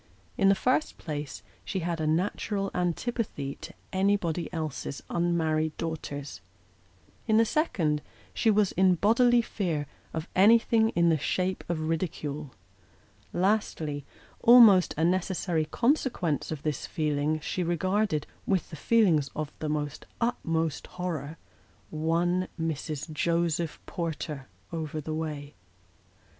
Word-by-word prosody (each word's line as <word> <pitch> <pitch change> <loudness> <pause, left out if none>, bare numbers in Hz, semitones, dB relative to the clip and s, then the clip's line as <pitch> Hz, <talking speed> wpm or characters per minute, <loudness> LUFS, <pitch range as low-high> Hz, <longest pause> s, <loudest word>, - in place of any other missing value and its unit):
In 195 - +4
the 195 - +5
first 255 +8 0
place, 145 -3 -5 0.2
she 190 - -3
had 170 -1 -2
a 155 - 0
natural 195 +4 0
antipathy 180 - -2
to - - -7 0.2
anybody 190 -4 +1
else's 155 -4 -4
un 170 0 +1
married 155 -1 0
daughters; 145 - -5 0.9
in 220 -1 +4
the 225 - +5
second, 170 - 0 0.3
she 225 - +2
was 210 -2 +3
in 185 0 +4
bodily 235 +5 +4
fear 170 -10 -2 0.3
of 160 0 -4
anything 225 +2 +5
in 170 0 +4
the 160 -2 +2
shape 185 +6 -1
of 170 -2 -1
ridicule; 155 -3 -3 0.8
lastly 175 -7 0 0.4
almost 225 -6 +7
a 160 - +1
necessary 175 -2 0
consequence 235 - 0
of 155 -2 -5
this 150 -4 -2
feeling 150 0 0
she 180 - -3
regarded, 180 -1 0 0.2
with 190 -5 +2
feelings 160 -4 +2
of 150 -1 -3
the 150 -2 -2 0.3
utmost 165 - -1
horror, 165 -4 -3 0.5
one 170 +4 +1
Mrs. 155 -1 -3
Joseph 170 0 0
Porter 155 -5 -4 0.3
over 155 -1 -3
the 155 +1 -4
way. 150 -2 -4
165 Hz, 120 wpm, -28 LUFS, 155-195 Hz, 0.9 s, almost